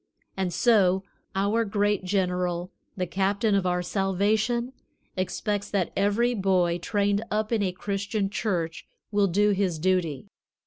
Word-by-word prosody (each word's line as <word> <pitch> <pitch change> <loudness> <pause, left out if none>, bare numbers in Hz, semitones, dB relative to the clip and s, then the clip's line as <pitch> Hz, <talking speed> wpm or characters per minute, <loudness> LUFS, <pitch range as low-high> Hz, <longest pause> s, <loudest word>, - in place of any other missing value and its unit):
And 190 -2 -1
so 190 -3 +3 0.3
our 205 +4 +2
great 205 -2 0
General, 180 -2 -1 0.3
the 180 - 0
Captain 200 +4 0
of 195 -2 +2
our 180 0 0
salvation, 210 +6 0 0.4
expects 205 +2 -2
that 195 -4 -1
every 205 +5 +2
boy 185 -4 +1
trained 205 +3 0
up 215 +1 -1
in 225 -2 +2
a 190 -2 +1
Christian 200 +2 -2
church 180 -5 -2 0.2
will 205 -1 +3
do 205 +3 +3
his 190 -4 0
duty. 175 -2 0
195 Hz, 135 wpm, -26 LUFS, 180-210 Hz, 0.4 s, so